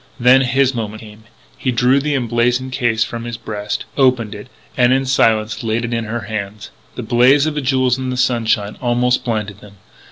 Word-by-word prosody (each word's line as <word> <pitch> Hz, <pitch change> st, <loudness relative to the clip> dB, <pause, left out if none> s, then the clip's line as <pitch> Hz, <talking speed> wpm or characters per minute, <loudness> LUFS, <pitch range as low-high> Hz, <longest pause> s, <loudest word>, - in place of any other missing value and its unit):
Then 125 Hz, +2 st, +5 dB
his 135 Hz, +1 st, +1 dB
moment 110 Hz, -2 st, -5 dB
came: 110 Hz, 0 st, -14 dB, 0.3 s
he 130 Hz, -, -1 dB
drew 125 Hz, +3 st, +3 dB
the 145 Hz, +1 st, -1 dB
emblazoned 120 Hz, +1 st, 0 dB
case 120 Hz, -4 st, +1 dB
from 115 Hz, -1 st, -6 dB
his 120 Hz, -1 st, -6 dB
breast, 105 Hz, -3 st, -5 dB
opened 125 Hz, -6 st, +2 dB
it, -, -, -10 dB, 0.3 s
and, 125 Hz, 0 st, +3 dB
in 135 Hz, +1 st, +2 dB
silence, 110 Hz, -4 st, +1 dB
laid 115 Hz, +1 st, -1 dB
it 120 Hz, -, -4 dB
in 115 Hz, -1 st, -2 dB
her 115 Hz, +2 st, -4 dB
hands. 105 Hz, -1 st, -6 dB, 0.2 s
The -, -, -5 dB
blaze 130 Hz, +4 st, +4 dB
of 155 Hz, -, -1 dB
the 150 Hz, -, -3 dB
jewels 130 Hz, -1 st, +1 dB
in 130 Hz, -1 st, -3 dB
the 125 Hz, -, -3 dB
sunshine 115 Hz, -4 st, 0 dB
almost 125 Hz, 0 st, +1 dB
blinded 105 Hz, -4 st, -3 dB
them. 105 Hz, -1 st, -15 dB
120 Hz, 195 wpm, -18 LUFS, 110-130 Hz, 0.3 s, Then